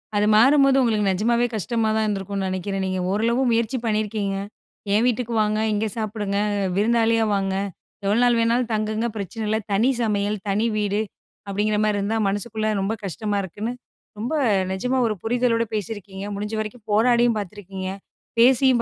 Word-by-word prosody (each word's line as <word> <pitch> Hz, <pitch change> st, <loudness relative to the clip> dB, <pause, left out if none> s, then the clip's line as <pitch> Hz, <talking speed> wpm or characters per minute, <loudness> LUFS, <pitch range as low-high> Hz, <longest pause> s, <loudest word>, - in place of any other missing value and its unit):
அது 205 Hz, 0 st, +3 dB
மாறும்போது 275 Hz, +3 st, +5 dB
உங்களுக்கு 215 Hz, -5 st, +2 dB
நெஜமாவே 235 Hz, +5 st, +2 dB
கஷ்டமாதான் 220 Hz, +2 st, 0 dB
இருந்திருக்கும்ன்னு 195 Hz, -1 st, -2 dB
நெனைக்கிறேன். 190 Hz, +1 st, -2 dB
நீங்க 185 Hz, 0 st, -2 dB
ஓரளவு 230 Hz, +5 st, +1 dB
முயற்சி 230 Hz, +2 st, +1 dB
பண்ணியிருக்கீங்க. 210 Hz, -2 st, -1 dB, 0.6 s
என் 220 Hz, +4 st, +3 dB
வீட்டுக்கு 240 Hz, -1 st, -1 dB
வாங்க, 215 Hz, 0 st, +1 dB
இங்க 210 Hz, +1 st, 0 dB
சாப்பிடுங்க, 210 Hz, -2 st, -2 dB, 0.4 s
விருந்தாளியா 225 Hz, +2 st, +3 dB
வாங்க, 195 Hz, -1 st, -1 dB, 0.5 s
எவ்வளவு 205 Hz, +4 st, +2 dB
நாள் 240 Hz, -1 st, +4 dB
வேணாலும் 235 Hz, +1 st, +1 dB
தங்குங்க 215 Hz, +2 st, -1 dB
பிரச்சனையில்ல, 215 Hz, +2 st, -2 dB
"தனி 220 Hz, +6 st, +3 dB
சமையல், 210 Hz, -1 st, 0 dB
தனி 210 Hz, +3 st, +1 dB
வீடு" 205 Hz, 0 st, 0 dB, 0.5 s
அப்படீங்கற 210 Hz, +2 st, 0 dB
மாரி 210 Hz, -1 st, +1 dB
இருந்தா, 215 Hz, +3 st, -1 dB
மனசுக்குள்ள 215 Hz, +2 st, -2 dB
ரொம்ப 200 Hz, +3 st, 0 dB
கஷ்டமா 205 Hz, +2 st, -2 dB
இருக்குன்னு, 210 Hz, +6 st, -4 dB, 0.5 s
ரொம்ப 245 Hz, +8 st, -3 dB, 0.4 s
நெஜமா 250 Hz, +7 st, -1 dB
ஒரு 215 Hz, -, -1 dB
புரிதலோட 235 Hz, 0 st, +1 dB
பேசியிருக்கீங்க. 200 Hz, -2 st, -5 dB
முடிஞ்ச 210 Hz, +2 st, -4 dB
வரைக்கும் 215 Hz, +1 st, -6 dB
போராடியும் 235 Hz, +1 st, +3 dB
பார்த்திருக்கீங்க, 195 Hz, -1 st, -6 dB, 0.5 s
பேசியும் 255 Hz, 0 st, +5 dB
215 Hz, 140 wpm, -23 LUFS, 200-230 Hz, 0.6 s, மாறும்போது